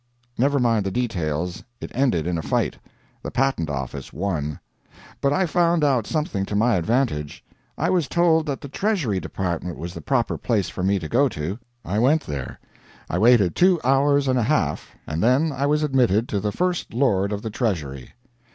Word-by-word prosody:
Never 140 +4 +2
mind 115 -4 +2
the 95 - -1
details. 90 -7 -2 0.2
It - - -7
ended 120 - +1
in 85 -1 -1
a - - -2
fight. - - 0 0.5
The - - -5
Patent 130 - 0
Office 70 -1 -5
won. 75 -4 -3 0.6
But 140 - +2
I 190 +5 +2
found 170 0 +2
out 130 -6 +2
something 150 -11 -1
to 105 - -3
my 115 +3 +3
advantage. 90 - -1 0.3
I - - +1
was 175 -6 +1
told 165 -2 +2
that 140 -2 -3
the - - -7
Treasury 150 - 0
Department 90 +1 -3
was 85 +3 -6
the - - -8
proper 125 -4 0
place 110 -6 0
for - - -6
me 100 +2 +2
to 85 -4 -5
go 135 - +3
to. 90 +4 -4 0.3
I 100 +5 -1
went 145 +7 +3
there. 70 -3 -5 0.5
I 90 - 0
waited 110 -5 +4
two 180 -1 +4
hours 140 +2 +3
and 130 -1 +2
a 110 - 0
half, - - -1
and 80 +2 -3
then 130 - +3
I 140 +1 -1
was 150 +1 +2
admitted 125 -6 +2
to 100 - 0
the 105 +1 -1
First 180 - -2
Lord 100 -7 +2
of 105 0 -3
the 110 - -4
Treasury. 75 - -3
115 Hz, 190 wpm, -23 LUFS, 90-140 Hz, 0.6 s, waited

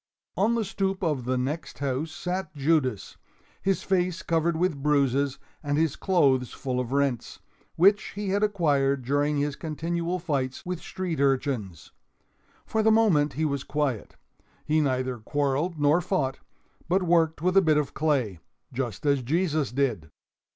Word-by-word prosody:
On 220 +5 +2
the 230 -2 0
stoop 195 0 -2
of 150 -7 0
the 130 +1 0
next 145 +6 -3
house 140 +3 -2
sat 180 -1 -4
Judas, 140 -6 0 0.4
his 195 0 0
face 180 -2 0
covered 165 0 +1
with 165 -5 0
bruises 140 -1 +2 0.2
and 145 -1 -1
his 160 -2 +1
clothes 135 -10 +2
full 125 -2 -3
of 125 -1 -3
rents, 140 -3 -1 0.4
which 200 +4 +3
he 205 -1 -3
had 200 +2 +1
acquired 145 -10 +1
during 145 +2 +1
his 145 0 -1
continual 170 +3 -3
fights 140 -7 -3
with 180 -1 -4
street 180 -5 -4
urchins. 130 - -1 0.7
For 220 - 0
the 220 - +4
moment 185 -11 +3
he 155 +5 -1
was 140 -2 -1
quiet, 140 -7 -2 0.5
he 155 +1 +2
neither 130 -3 -1
quarreled 145 +7 -1
nor 145 +4 +4
fought, 155 -8 -1 0.5
but 185 +2 +2
worked 165 -3 +2
with 180 +1 +2
a 195 - +7
bit 155 -4 +3
of 150 -2 -1
clay, 135 - 0 0.3
just 120 -2 -4
as 140 -2 +3
Jesus 155 +2 0
did. 120 - -1
150 Hz, 155 wpm, -26 LUFS, 135-175 Hz, 0.7 s, a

